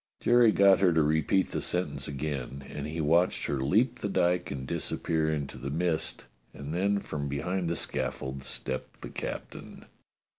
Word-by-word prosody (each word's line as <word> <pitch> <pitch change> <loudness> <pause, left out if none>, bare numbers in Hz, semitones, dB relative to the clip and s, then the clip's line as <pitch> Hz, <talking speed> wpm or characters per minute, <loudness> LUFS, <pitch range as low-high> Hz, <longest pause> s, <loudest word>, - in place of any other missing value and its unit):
Jerry 120 -2 +5
got 100 -2 +6
her 95 -2 +5
to 80 -1 +4
repeat 80 +5 +2
the - - -2
sentence 90 +1 -1
again, 70 -2 -4
and 75 +1 -5
he 80 +2 -4
watched 85 +4 +2
her 70 -2 -1
leap 115 - +2
the 105 - -2
dyke 90 -1 +1
and 65 -2 -5
disappear 80 +2 -1
into 70 -4 -3
the 65 +3 -4
mist, 80 +2 -1 0.3
and 70 +2 -6
then 100 +3 +2
from 75 -7 -4
behind 90 +5 -1
the 85 - 0
scaffold 65 -1 -3
stepped 65 -1 -6
the - - -5
captain. - - -7
80 Hz, 170 wpm, -29 LUFS, 70-90 Hz, 0.3 s, got